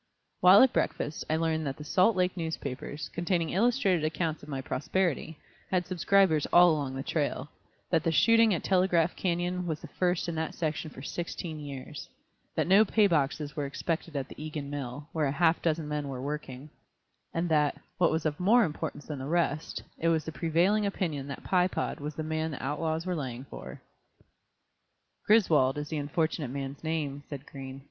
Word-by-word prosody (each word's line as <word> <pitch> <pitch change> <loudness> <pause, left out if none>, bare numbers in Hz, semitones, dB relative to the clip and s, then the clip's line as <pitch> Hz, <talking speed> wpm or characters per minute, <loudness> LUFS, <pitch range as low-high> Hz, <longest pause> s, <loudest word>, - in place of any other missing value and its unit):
While 185 +6 +8
at 260 - +4
breakfast 150 - -1
I 155 - +2
learned 160 -1 0
that 135 - -3
the 150 - -8
Salt 185 +8 +3
Lake 180 0 +1
newspapers, 155 -3 -5
containing 170 -1 0
illustrated 200 - +2
accounts 155 0 -1
of 145 - -12
my 135 -2 -3
prosperity, 160 +4 -1 0.3
had 180 -1 +1
subscribers 185 -3 +3
all 175 0 +7
along 140 -4 -2
the 135 - -4
trail; 145 -2 -2 0.4
that 165 -3 +3
the 165 - +1
shooting 230 +6 +5
at 175 - 0
Telegraph 180 -3 +2
Canyon 175 0 -1
was 155 -2 -2
the - - -8
first 180 -1 0
in 170 - -2
that 160 0 -3
section 155 -1 -2
for 130 - -11
sixteen 165 0 -5
years; 140 0 -8 0.5
that - - +1
no 195 +4 +6
pay 215 0 +3
boxes 150 -3 0
were 145 -3 -2
expected 160 +2 -3
at 135 -2 -2
the - - -9
Egan 150 -2 -5
mill, 140 0 -5
where 155 -3 +1
a - - 0
half 165 +3 +2
dozen 160 -2 0
men 150 -1 -2
were 135 -2 -5
working; 140 0 -6 0.6
and 170 +1 -1
that, 150 -2 +2 0.2
what 175 - +5
was 160 0 -1
of 150 -1 -1
more 225 +7 +5
importance 150 -3 -4
than 150 -3 -5
the 135 - -5
rest, 165 -1 -1 0.2
it 165 - 0
was 160 -2 +2
the 160 - -4
prevailing 175 +6 +2
opinion 165 -8 -2
that 140 - -7
Pye 180 -1 +3
Pod - - -3
was 150 +1 -5
the 155 - -3
man 160 +1 -1
the 140 - -6
outlaws 160 +4 -1
were 185 - -1
laying 130 -5 -4
for. - - -9 1.5
"Griswold 155 - +4
is 150 0 -4
the 155 - -2
unfortunate 150 0 -1
man's 135 +2 -5
name," 150 -3 -2
said 140 -2 -7
Green. 135 -1 -8
160 Hz, 190 wpm, -29 LUFS, 145-175 Hz, 1.5 s, While